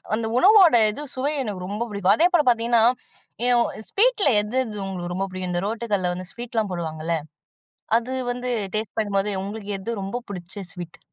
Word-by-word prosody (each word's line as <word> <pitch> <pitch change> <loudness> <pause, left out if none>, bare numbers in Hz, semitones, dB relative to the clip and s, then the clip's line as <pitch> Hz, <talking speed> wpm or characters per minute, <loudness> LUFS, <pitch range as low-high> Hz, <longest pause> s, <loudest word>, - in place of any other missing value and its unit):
அந்த 225 0 -1
உணவோட 375 - +7
இது 285 - -6
சுவை 275 +3 -1
எனக்கு 195 -6 -5
ரொம்ப 205 +4 -3
புடிக்கும். 200 -1 +3
அதேபோல 345 +1 +4
பாத்தீங்கன்னா, 235 -1 +2 0.6
எ - - +3 0.4
ஸ்வீட்ல 430 -6 +3
எது, 215 +5 -5
இது 210 -2 -7
உங்களுக்கு 175 -2 -4
ரொம்ப 195 +1 -1
புடிக்கும்? 185 -1 -5
இந்த 175 +1 -1
ரோட்டுகடைல 205 -5 -1
வந்து 180 0 -7
ஸ்வீட்லாம் 230 -4 -3
போடுவாங்கல்ல, 165 -1 -3 0.8
அது 245 +2 -6 0.2
வந்து 250 +1 -5 0.3
டேஸ்ட் 215 -1 -3
பண்ணும்போது 205 -1 0
உங்களுக்கு 205 +1 -6
எது 210 +5 -5
ரொம்ப 195 +5 -4
புடிச்ச 180 -2 -7 0.2
ஸ்வீட்? 175 -2 -9
210 Hz, 160 wpm, -23 LUFS, 185-240 Hz, 0.8 s, உணவோட